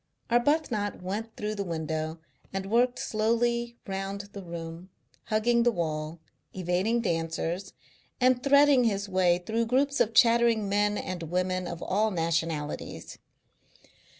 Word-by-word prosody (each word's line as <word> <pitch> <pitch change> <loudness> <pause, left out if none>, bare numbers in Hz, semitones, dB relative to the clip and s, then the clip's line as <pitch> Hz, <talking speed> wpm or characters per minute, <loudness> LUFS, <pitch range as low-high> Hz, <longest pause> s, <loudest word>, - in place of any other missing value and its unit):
Arbuthnot 240 - +1
went 215 +5 -4
through 210 0 -2
the 200 -1 -3
window 160 -2 -3 0.3
and 195 +1 -4
worked 245 +2 +3
slowly 235 +2 0
round 195 0 -4
the 200 - -7
room, 170 0 -8 0.4
hugging 235 +2 +2
the 240 0 +4
wall, 155 -3 -3 0.4
evading 190 +6 0
dancers, 170 0 -2 0.5
and 255 -1 +3
threading 280 -2 +5
his 200 -2 0
way 185 -2 +3
through 230 +1 0
groups 280 +4 +1
of 225 +2 +1
chattering 230 -2 +4
men 205 +1 +1
and 185 -2 -4
women 180 +2 -1
of 170 0 -6
all 215 +3 +1
nationalities. 165 -4 -3
200 Hz, 125 wpm, -28 LUFS, 175-235 Hz, 0.5 s, threading